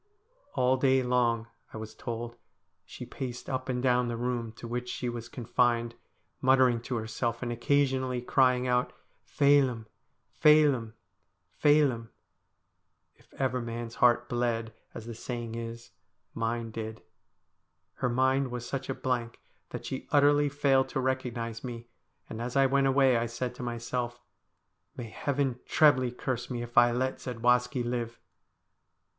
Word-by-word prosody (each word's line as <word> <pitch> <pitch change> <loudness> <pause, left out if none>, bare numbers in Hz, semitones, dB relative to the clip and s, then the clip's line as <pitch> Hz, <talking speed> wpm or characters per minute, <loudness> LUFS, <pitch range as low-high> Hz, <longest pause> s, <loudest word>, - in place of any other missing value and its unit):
All 130 +1 +3
day 130 0 +3
long, 120 -2 +1 0.3
I - - -8
was 110 0 -7
told, 120 0 -5 0.5
she - - -9
paced 125 -2 -6
up 130 0 -3
and 125 -1 -1
down 125 -1 +3
the 120 -1 -3
room 120 -1 -2
to 115 - -9
which 125 +1 -4
she 125 - -3
was 120 0 -6
confined, 120 -1 0 0.5
muttering 130 -3 +4
to 120 +1 -4
herself, 115 +2 -2
and 120 - -2
occasionally 130 0 +1
crying 125 0 +2
out 125 0 +1 0.2
' - - -42
Phelim, 135 -5 +4 0.5
Phelim, 145 -7 +4 0.6
Phelim.' 140 -6 +2 1.0
If - - -27
ever 130 -2 -1
man's 115 0 -5
heart 120 0 +4
bled, 115 -2 -1 0.2
as 110 - -7
the 115 - -6
saying 115 0 -5
is, 115 0 -7 0.4
mine 115 0 -2
did. 110 0 -6 0.9
Her 125 - 0
mind 130 +2 +2
was 120 -1 -5
such 135 -1 -4
a 135 - -1
blank 120 -3 -2 0.3
that - - -7
she 130 - -5
utterly 145 0 +4
failed 135 -2 +2
to - - -2
recognise 120 -3 -2
me, 120 -2 -6 0.4
and 110 - -6
as 125 +2 -4
I 135 0 +5
went 135 +1 +3
away 135 -2 +4
I 115 +1 0
said 120 +2 -4
to - - -10
myself, 120 0 -3 0.4
' - - -49
May 115 -3 -6
Heaven 135 -2 -1
trebly 135 -5 +4
curse 125 0 -4
me 120 -2 -3
if 120 0 -10
I 120 0 +6
let 130 +2 -1
Zadwaski 125 +1 +1
live 120 -1 -3
125 Hz, 150 wpm, -29 LUFS, 115-130 Hz, 1.0 s, I